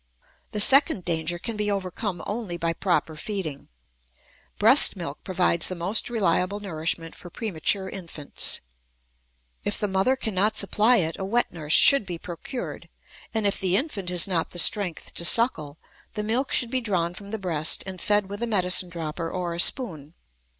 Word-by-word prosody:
The 210 - -4
second 275 - +6
danger 165 0 -1
can 225 +6 -6
be 210 0 -2
overcome 195 -1 -4
only 205 -5 -5
by 165 0 -1
proper 165 -4 -1
feeding. 155 -4 -5 0.9
Breast - - +6
milk - - -7
provides 85 0 0
the 185 - -4
most 185 +8 -1
reliable 200 -3 0
nourishment 165 -3 -4
for 175 - -11
premature 190 -1 -1
infants. 165 -7 -4 1.0
If - - 0
the 210 - -1
mother 195 +7 +1
cannot 215 -4 -1
supply 220 +4 +3
it, 165 -5 -1
a - - -4
wet 230 +5 -1
nurse 155 -2 -2
should 275 -8 +6
be 175 -2 -5
procured, 180 +9 -8 0.4
and, 220 -2 -2
if 200 - +1
the 185 -1 0
infant 205 - -4
has 180 -1 +1
not 175 -4 -1
the - - -11
strength 175 +1 +2
to - - -2
suckle, 170 - +4 0.4
the 210 - -3
milk 240 +6 -1
should 240 -2 +1
be 260 - -1
drawn 180 -6 -2
from 200 +2 -11
the 220 - -4
breast 165 -6 0
and 190 -2 -7
fed 205 -1 +1
with 200 +2 -8
a 235 - -1
medicine 185 -4 +1
dropper 165 0 -5
or 175 -1 -4
a 170 - -6
spoon. 170 - +2
190 Hz, 170 wpm, -24 LUFS, 170-210 Hz, 1.0 s, second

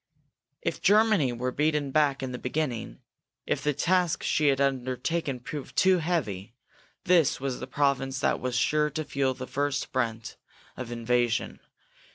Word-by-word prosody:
If - - -2
Germany 210 - +4
were 125 +2 -2
beaten 150 0 0
back 140 -2 +2
in 130 - -3
the 125 - -5
beginning, 125 - -3 0.4
if - - -1
the 150 - +1
task 180 +3 +1
she 150 - +2
had 135 -1 +3
undertaken 135 +2 -1
proved 140 +3 -7
too 185 -1 +4
heavy, 120 - -2 0.5
this 175 -5 +3
was 135 -1 -3
the 130 - -6
province 135 -1 0
that - - +1
was 125 -1 -3
sure 150 +4 +2
to 155 +2 -3
feel 135 -2 0
the 130 0 -6
first 145 +1 -2
brunt 115 -3 -2 0.4
of 125 -2 -6
invasion. 120 0 0
135 Hz, 155 wpm, -27 LUFS, 125-150 Hz, 0.5 s, Germany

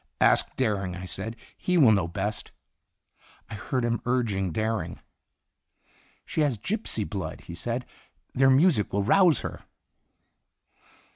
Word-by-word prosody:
"Ask - - +3
Dering," 100 -8 0
I 90 +1 -7
said; 105 +5 -5 0.2
"he 180 -1 0
will 135 -9 +7
know 100 -5 +2
best." 100 +4 -4 1.0
I - - -5
heard 125 +3 -2
him 115 -1 0
urging 105 -7 0
Dering. 110 +4 -2
Itinerant - - -16 1.2
"She - - -1
has 140 -6 +1
gypsy 185 - -3
blood," 95 -3 -5
he - - -10
said; 120 +8 -3 0.5
"their 135 +1 +4
music 135 - +4
will 100 0 0
rouse 175 - +4
her." - - -6
110 Hz, 135 wpm, -27 LUFS, 100-130 Hz, 1.2 s, will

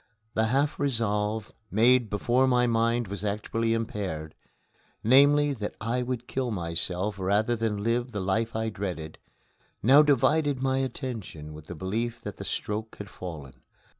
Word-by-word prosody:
The 110 +1 +2
half 140 +5 +1
resolve, 110 -5 0 0.2
made 120 +3 +4
before 120 +6 +2
my 125 -1 +3
mind 115 0 +1
was 100 +1 -6
actually 110 +2 0
impaired, 95 -9 -4 0.7
namely, 145 +4 +5
that 105 -5 -5
I 115 +3 -1
would 125 -1 -3
kill 130 -2 -2
myself 90 +1 -1
rather 105 +5 +2
than 110 -3 -2
live 120 +2 0
the 105 - -3
life 110 +4 -1
I 110 0 0
dreaded, 90 -6 -5 0.6
now 135 +7 +8
divided 145 0 +3
my 130 0 +1
attention 115 - -5
with 75 0 -11
the 90 - -7
belief 110 +8 -2
that - - -7
the - - -7
stroke 110 +1 -3
had 105 -2 -8
fallen. 70 -8 -8
110 Hz, 150 wpm, -27 LUFS, 100-125 Hz, 0.7 s, now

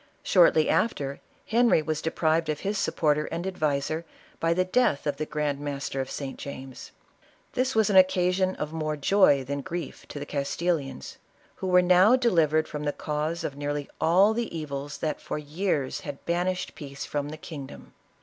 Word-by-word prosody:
Shortly 170 -4 +5
after, 140 -11 0 0.2
Henry 230 -7 +3
was 155 0 -2
deprived 160 0 +1
of 155 -1 -2
his 200 +1 -1
supporter 150 -2 +1
and 170 +2 -4
adviser, 155 -3 -1 0.4
by 165 - +1
the 185 +2 +2
death 185 - +2
of 145 -2 -1
the 155 +1 -3
grand 150 -2 -1
master 140 -2 -3
of 130 - -5
St. 135 -2 -6
James; 135 -2 -8 0.6
this 255 0 0
was 220 -2 +3
an - - +1
occasion 185 0 +4
of 150 +1 -5
more 155 -1 -2
joy 145 -3 +4
than 140 +2 -3
grief 170 0 -6
to - - -8
the 145 - -5
Castilians, 140 - -2 0.4
who 190 - -4
were 180 0 +5
now 185 +6 +6
delivered 165 - +2
from 150 0 -5
the 145 - 0
cause 155 +3 -3
of 140 - -3
nearly 145 0 -3
all 190 +6 +5
the 230 -7 -3
evils 145 -2 -5
that 155 -1 -3
for - - -4
years 150 -2 -2
had 145 -1 -8
banished 180 +2 -1
peace 140 -2 -7
from 145 0 -3
the 155 - -7
kingdom. 150 -4 -9
155 Hz, 175 wpm, -27 LUFS, 145-180 Hz, 0.6 s, now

